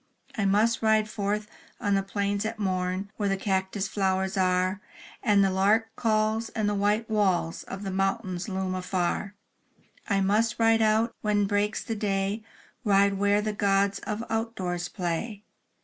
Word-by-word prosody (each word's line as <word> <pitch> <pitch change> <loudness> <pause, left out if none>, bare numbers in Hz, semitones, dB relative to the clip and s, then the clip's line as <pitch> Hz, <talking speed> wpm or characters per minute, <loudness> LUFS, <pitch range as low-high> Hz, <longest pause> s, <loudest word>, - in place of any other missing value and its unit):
I 215 - 0
must 215 +4 +3
ride 220 -1 +3
forth 210 0 -2 0.3
on 205 - 0
the 195 - +3
plains 200 +1 -1
at 220 +1 -3
morn, 185 0 -2
Where 205 -2 0
the 195 - +1
cactus 190 0 -1
flowers 190 0 0
are, 185 +1 +1 0.4
And 205 -1 +4
the 195 - +2
lark 215 +4 +2
calls, 220 0 +1
and 215 -2 -1
the 205 - +1
white 205 +3 +1
walls 190 -6 +1
Of 195 +1 -7
the 195 - -3
mountain 195 -1 -1
loom 190 -2 -2
afar; 185 +2 -2 0.7
I 200 -2 +2
must 215 +4 +2
ride 225 0 +4
out, 220 +2 +2
when 205 -1 +2
breaks 205 +1 0
the 225 - -3
day 200 0 -1 0.2
— - - -31
Ride 200 -2 +4
where 205 +1 +3
the 215 0 -1
gods 200 -1 +2
of 215 +2 -4
outdoors 190 -6 -2
play. 190 +4 -3
200 Hz, 165 wpm, -27 LUFS, 190-215 Hz, 0.7 s, And